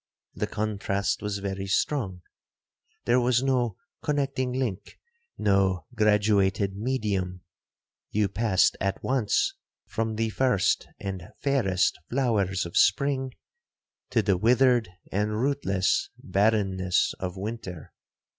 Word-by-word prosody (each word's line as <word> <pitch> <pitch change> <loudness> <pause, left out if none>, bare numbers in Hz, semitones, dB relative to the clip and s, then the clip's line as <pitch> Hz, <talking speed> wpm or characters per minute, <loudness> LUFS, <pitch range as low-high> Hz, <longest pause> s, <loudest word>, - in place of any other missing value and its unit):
The - - -2
contrast 100 -2 -1
was 105 -1 -2
very 95 -1 -4
strong; 95 -4 -1 0.8
there 120 +1 +4
was 125 0 +2
no 125 -4 +1 0.2
connecting 135 -3 -1
link, 125 -7 -3 0.4
no 95 -2 +2
graduated 105 -3 +2
medium,—you 100 -2 -3
passed 100 -2 +2
at 100 0 -1
once 130 - +1 0.3
from 110 -1 -2
the 110 0 -1
first 125 -6 +1
and 95 -3 -5 0.2
fairest 125 -10 +2
flowers 105 -7 +1
of 85 - -8
spring, 130 +5 +2 0.8
to 115 - +2
the 100 -2 +2
withered 120 0 +3 0.2
and 105 +2 0
rootless 120 -9 +1
barrenness 95 -3 +1
of 90 0 -4
winter. 95 -5 -6
105 Hz, 105 wpm, -27 LUFS, 95-125 Hz, 0.8 s, there